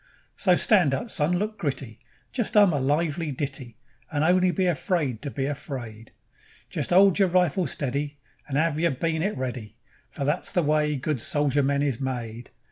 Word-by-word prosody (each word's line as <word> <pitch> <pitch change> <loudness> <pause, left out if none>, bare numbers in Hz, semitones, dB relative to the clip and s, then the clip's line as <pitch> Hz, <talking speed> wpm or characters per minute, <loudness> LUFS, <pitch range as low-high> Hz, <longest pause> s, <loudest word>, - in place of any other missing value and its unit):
So 185 -3 +3
stand 175 -9 +4
up, 230 - -5
son; 165 +4 +1
look 215 +3 -3
gritty, 135 -7 -4
And 125 +1 -36
just 235 -4 0
'um 200 -5 +6
a 145 - +1
lively 150 +3 0
ditty, 135 -4 -4 0.3
And 150 -1 -1
only 180 +2 +4
be 185 +1 0
afraid 155 - -1
to 145 - -4
be 135 0 -3
afraid; 130 -6 -6 0.6
Just - - -2
'old 195 +2 +5
yer 195 - +5
rifle 180 -1 +2
steady, 145 +2 -3 0.3
And 140 -1 -2
'ave 160 0 +1
yer 170 - +3
bay'nit 165 +7 -1
ready, 125 -5 -5 0.3
For 140 - -4
that's 150 +5 0
the 175 - +1
way 150 0 +1
good 140 0 -2
soldier 145 +1 +1
men 140 +1 +1
is 135 -4 -1
made. 120 -3 -5
145 Hz, 180 wpm, -25 LUFS, 135-175 Hz, 0.6 s, um